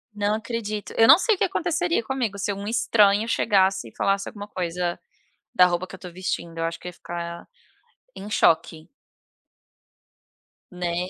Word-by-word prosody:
Não 205 +1 0
acredito, 215 -2 -5
eu 225 - +5
não 310 - +10
sei 440 +3 +2
o - - -14
que - - +2
aconteceria 350 -6 0
comigo 235 -6 -2
se 200 +1 -2
um 200 +1 -7
estranho 215 -2 +3
chegasse 190 - +2
e - - -25
falasse 195 0 0
alguma 205 -1 -9
coisa 175 -2 -3 0.6
da 180 -5 +7
roupa 175 +1 -1
que 190 - -12
eu - - -9
estou 180 -2 -10
vestindo 170 -2 -4
eu 165 - -1
acho 165 0 -3
que 180 - -7
ia - - -7
ficar 170 0 -7 0.7
em 205 +2 -8
choque. 160 -3 +1 1.8
Né. 180 0 -3
195 Hz, 170 wpm, -24 LUFS, 175-220 Hz, 1.8 s, não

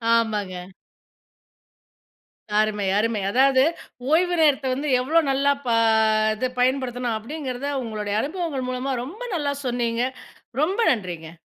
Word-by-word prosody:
ஆமாங்க. 210 -5 0 2.1
அருமை, 210 -2 +1
அருமை. 220 -1 0
அதாவது 265 +1 +4 0.5
ஓய்வு 350 +2 +3
நேரத்தை 285 -3 +3
வந்து 285 +3 -2
எவ்ளோ 305 +6 +3
நல்லா 275 +1 +2
ப - - -2 0.7
இது 255 +4 -1
பயன்படுத்தணும்? 250 -2 0
அப்படிங்கறத 270 +2 -5
உங்களுடைய 210 -3 -3
அனுபவங்கள் 300 -5 -3
மூலமா 255 +2 -2
ரொம்ப 375 - -9
நல்லா 285 -3 -1
சொன்னீங்க. 240 -1 0 0.6
ரொம்ப 370 +8 0
நன்றிங்க. 175 -7 -4
255 Hz, 110 wpm, -23 LUFS, 220-285 Hz, 2.1 s, அதாவது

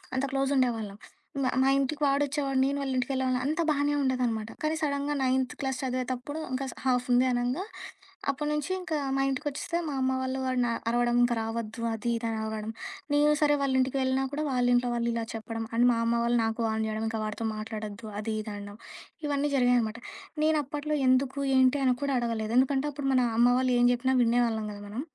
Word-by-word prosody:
అంత 260 - +1
క్లోజుండేవాళ్ళం. 255 -7 0 0.5
మా 255 - +2
మా 270 - +4
ఇంటికి 280 +2 -1
వాడొచ్చేవాడు. 275 -1 +1
నేను 280 +1 0
వాళ్ళింటికి 260 -1 -1
వెళ్ళేవాళ్ళం 260 -1 0
అంతా 315 +3 0
బానే 290 0 +2
ఉండేదనమాట. 240 -4 0
కానీ 310 +1 0
సడెన్‌‌గా 285 0 -1
నైన్త్ 260 0 +1
క్లాస్ 265 -2 -2
చదివేతప్పుడు, 255 +3 -3
ఇంకా 260 +1 -2
స్ - - -13
హాఫ్ 250 -1 +2
ఉంది 245 +1 +5
అనంగా. 245 +8 0 0.7
అప్పటి 295 +2 -1
నుంచి 300 +4 -2
ఇంకా 335 -4 -2 0.2
మా 270 - +1
ఇంటికొచ్చేస్తే 290 +5 -2
మా 290 - -3
అమ్మ 260 0 +2
వాళ్ళు 260 0 -2
వాడిని 250 -2 +1 0.2
అరవడం 240 0 +2
ఇంక 240 0 +2
రావద్దు. 225 +1 -4
అది 235 +2 -3
ఇదని 225 -1 -2
అరవడం. 220 0 -4 0.4
నేను 295 +1 +4
సరే 295 -1 +4
వాళ్ళింటికి 260 -1 +1
వెళ్ళినా 260 +1 +1
కూడా 305 +1 -1
వాళ్ళింట్లో 245 -1 +2
వాళ్ళు 235 0 0
ఇలా 230 -1 -2
చెప్పడం. 225 +1 -5
అండ్ 240 +2 +5
మా 235 - +1
అమ్మ 235 0 +2
వాళ్ళు 235 0 +2
నాకు 225 +1 -2
వార్న్ 220 0 -1
జేయడం 220 +1 -2
ఇంక 225 - -3
వాడితో 215 +1 -3
మాట్లాడొద్దు. 215 0 -6
అది 220 0 -3
ఇదని 210 -1 -6
అనడం. 205 +1 -9 0.5
ఇవన్నీ 290 0 0
జరిగాయనమాట. 245 -3 +2 0.5
నేనప్పట్లో 300 -1 0
ఎందుకు 265 +2 +2 0.2
ఏంటి 260 +2 +4
అని 255 -1 +3
కూడా 280 -2 0
అడగలేదు. 225 -2 -2
ఎందుకంటే, 270 +2 +1
అప్పుడు 280 -1 -3
మన 255 -1 +4
అమ్మ 240 - +6
వాళ్ళు 255 -1 +1
ఏం 245 - +5
చెప్పినా 260 +2 +1
వినేవాళ్ళం 230 -2 +1
కదా 205 - -10
మనం. 225 +5 -4
255 Hz, 185 wpm, -28 LUFS, 230-275 Hz, 0.7 s, అమ్మ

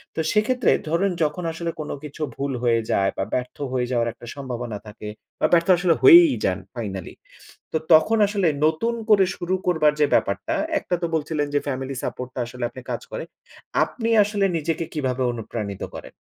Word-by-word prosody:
তো - - -3
সেক্ষেত্রে 225 +2 +2 0.2
ধরুন 185 +4 +1
যখন 155 +4 -1
আসলে 165 +1 -4
কোন 150 - -5
কিছু 150 +1 -9
ভুল 140 0 -2
হয়ে 115 -1 +3
যায় 95 0 +2
বা 95 - 0
ব্যর্থ 125 0 -2 0.2
হয়ে 125 -1 0
যাওয়ার 120 -2 +1
একটা 120 - -14
সম্ভাবনা 120 -5 -5
থাকে 105 0 -9 0.3
বা - - +3
ব্যর্থ 170 +1 +4
আসলে 175 -1 +3
হয়েই 345 -5 +9
যান - - 0 0.2
ফাইনালি। - - -5 0.6
তো - - 0 0.2
তখন 215 +8 +5
আসলে 200 -4 +1 0.2
নতুন 160 +10 0
করে 205 -3 +6
শুরু 180 +2 -2
করবার 160 -4 +3
যে 150 - +5
ব্যাপারটা, 100 0 0 0.2
একটা 180 - -3
তো - - +2
বলছিলেন 150 -1 -1
যে - - +5
ফ্যামিলি 135 0 -3
সাপোর্ট 125 - -4
টা 125 - -3
আসলে 125 0 -6
আপনি 130 - -10
কাজ - - -2
করে। - - -4 0.6
আপনি 230 -2 -4 0.2
আসলে 205 -1 -1
নিজেকে 165 +1 -1
কীভাবে 130 -4 -1
অনুপ্রাণিত 105 -3 -5
করেন? - - -9
150 Hz, 180 wpm, -23 LUFS, 125-180 Hz, 0.6 s, হয়েই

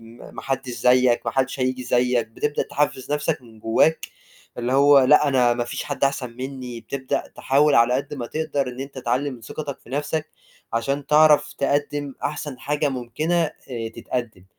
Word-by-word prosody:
امم، 115 +1 -14
ما - - -7
حدش 135 -1 -3
زيّك، 125 0 +3
ما 115 - -1
حدش 130 0 -1
هييجي 130 0 0
زيّك 125 -1 +2
بتبدأ 145 +6 -1
تحفِّز 145 -1 -1
نفسك 150 -1 -1
من 115 -2 -16
جواك، 115 +9 +2 0.5
اللي 120 +1 -1
هو 140 +1 +6
لأ 145 +3 +5
أنا 125 -3 +3
ما 120 0 -1
فيش - - -5
حد 145 -1 -1
أحسن 135 -3 -1
مني، 125 -2 -6
بتبدأ 130 +1 -3
تحاول 145 +2 +3
على 115 +2 +5
قد 135 +3 -2
ما 125 -4 -5
تقدر 145 -2 -2
إن 125 +1 -7
أنت 135 0 -7
تعلِّي 130 +3 -1
من 125 -3 -9
ثقتك 140 +5 -6
في - - -17
نفسك، 150 +3 -2 0.4
عشان 135 +5 -1
تعرف 150 0 +5
تقدِّم 145 0 -1
أحسن 145 -3 -4
حاجة 145 +2 0
ممكنة 130 +6 -2
آآ، 120 -6 -6
تتقدّم 110 -7 -5
130 Hz, 175 wpm, -23 LUFS, 125-145 Hz, 0.5 s, هو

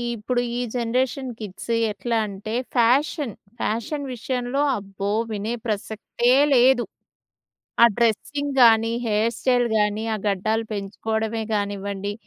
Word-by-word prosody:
ఇప్పుడు 245 +3 -1 0.2
ఈ - - -1 0.2
generation 255 +3 -1
kids 210 +2 -6 0.2
ఎట్లా 225 +4 -2
అంటే 200 +2 -6 0.2
ఫ్యాషన్, 255 - +2 0.3
ఫ్యాషన్ 275 +7 -2
విషయంలో 250 +2 -2 0.2
అబ్బో! 195 0 -4 0.2
వినే 215 +3 -2
ప్రసక్తే 220 +3 -1 0.2
లేదు! 245 0 +5 1.0
ఆ - - +11
డ్రెస్సింగ్ 280 +5 0
గానీ, 225 0 +5
హెయిర్ 220 +2 +1
స్టైల్ 245 -2 +2
గానీ, 210 +1 0
ఆ - - -1
గడ్డాలు 215 +4 0
పెంచుకోవడమే 220 +2 -2
గానివ్వండి. 200 0 -3
225 Hz, 110 wpm, -23 LUFS, 210-245 Hz, 1.0 s, ఆ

